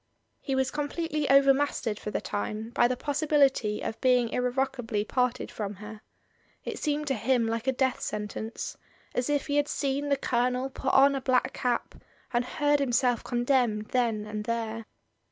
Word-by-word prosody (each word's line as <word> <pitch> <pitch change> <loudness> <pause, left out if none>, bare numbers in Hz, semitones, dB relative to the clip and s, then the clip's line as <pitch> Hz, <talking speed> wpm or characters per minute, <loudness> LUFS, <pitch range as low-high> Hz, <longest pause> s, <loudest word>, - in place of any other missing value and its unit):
He 270 - -2
was 265 0 +1
completely 300 0 -2
over 275 0 +7
mastered 265 -6 -1
for - - -5
the - - -1
time 215 +2 -4
by 240 0 +4
the 250 0 -2
possibility 280 -7 +1
of 220 - -4
being 250 -2 +3
irrevocably 250 -4 -1
parted 250 +1 -1
from 210 -1 -4
her. 210 +2 -10 0.6
It - - -4
seemed 300 0 -1
to - - +2
him 245 0 +1
like 230 +2 -2
a - - +5
death 260 0 0
sentence, 215 +1 -4 0.4
as 250 +3 -1
if 290 -1 +1
he 285 0 0
had 290 0 +2
seen 280 0 -1
the 280 - +3
Colonel 250 +1 0
put 265 - -1
on 275 +1 +7
a 270 - -2
black 255 -1 +1
cap 245 -1 -1 0.4
and 240 0 +2
heard 290 +3 +1
himself 245 -3 +1
condemned 240 -4 +1
then 230 -4 0
and 210 0 -5
there. 225 -1 -3
250 Hz, 170 wpm, -28 LUFS, 225-275 Hz, 0.6 s, over